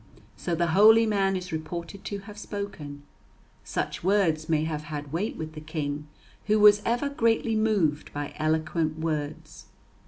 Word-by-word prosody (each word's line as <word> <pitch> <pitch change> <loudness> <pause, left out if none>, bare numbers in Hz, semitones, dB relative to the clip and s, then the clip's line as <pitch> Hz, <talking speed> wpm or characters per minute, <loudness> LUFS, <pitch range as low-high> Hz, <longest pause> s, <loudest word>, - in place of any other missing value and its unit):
So 175 - -2
the 170 +1 +1
holy 220 +4 +7
man 195 -3 +1
is 180 -1 -5
reported 170 +4 -5
to 200 -1 -4
have 205 +1 -11
spoken. 165 -10 -6 0.6
Such - - -3
words 170 -5 +2
may 155 -1 +2
have 155 -1 -3
had 150 -1 -6
weight 205 +7 -1
with 155 0 -6
the 155 - -8
King, 150 -1 -4 0.4
who 215 0 +3
was 210 0 +7
ever 240 +4 +1
greatly 230 -4 +1
moved 200 -9 +1
by 145 0 -5
eloquent 155 0 0
words. 155 -2 -4
170 Hz, 155 wpm, -27 LUFS, 155-205 Hz, 0.6 s, holy